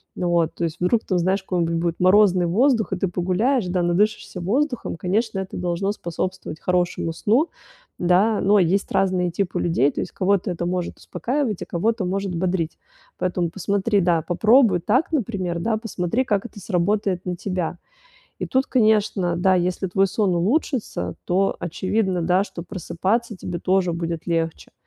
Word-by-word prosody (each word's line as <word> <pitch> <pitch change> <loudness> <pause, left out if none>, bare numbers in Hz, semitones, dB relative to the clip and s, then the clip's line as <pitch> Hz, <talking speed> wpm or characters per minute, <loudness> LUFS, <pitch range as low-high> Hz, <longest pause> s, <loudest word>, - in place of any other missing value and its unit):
Вот, 170 -2 +1
то - - -4
есть 165 -1 -2
вдруг 200 +6 +2
там, 185 - 0
знаешь, 185 +3 +1
какой-нибудь 170 -3 -1
будет 170 0 -1
морозный 185 -1 +5
воздух, 225 +3 +2
и - - -1
ты 195 - 0
погуляешь, 185 +8 0
да, 180 0 0
надышишься 185 +1 0
воздухом, 245 - -1
конечно, 195 +5 -1
это 190 0 -5
должно 180 +2 -1
способствовать 185 -3 -5
хорошему 175 -2 0
сну, 235 - +2 0.5
да, 185 +5 +3
но 205 +2 +4
есть 190 +2 +1
разные 185 -2 +1
типы 190 +1 -2
людей, 145 -5 +2
то - - -3
есть, - - -5
кого-то 195 0 +1
это 175 0 -3
может 180 -1 -3
успокаивать, 250 -6 -2
а - - -9
кого-то 215 +4 -1
может 195 0 -2
бодрить. 175 -2 -1 0.4
Поэтому 180 -2 -1
посмотри, 200 +3 0
да, 170 -2 +2
попробуй 215 - +4
так, 255 - +1
например, 195 - -1
да, 220 +6 0
посмотри, 225 +2 -2
как 205 -4 0
это 230 - -9
сработает 195 0 0
на 180 -1 -2
тебя. 180 -2 -3 0.6
И - - -3
тут, 260 +1 +1
конечно, 210 -7 +2
да, 185 +2 +3
если 180 +1 0
твой 190 +2 +2
сон 195 -1 0
улучшится, 195 - -1
то 195 +2 +1
очевидно, 185 +2 -1
да, 180 +3 +3
что 170 -4 -8
просыпаться 205 +5 -2
тебе 175 -1 -5
тоже 185 0 +1
будет 165 -1 -4
легче. 165 -2 -2
185 Hz, 165 wpm, -22 LUFS, 175-210 Hz, 0.6 s, морозный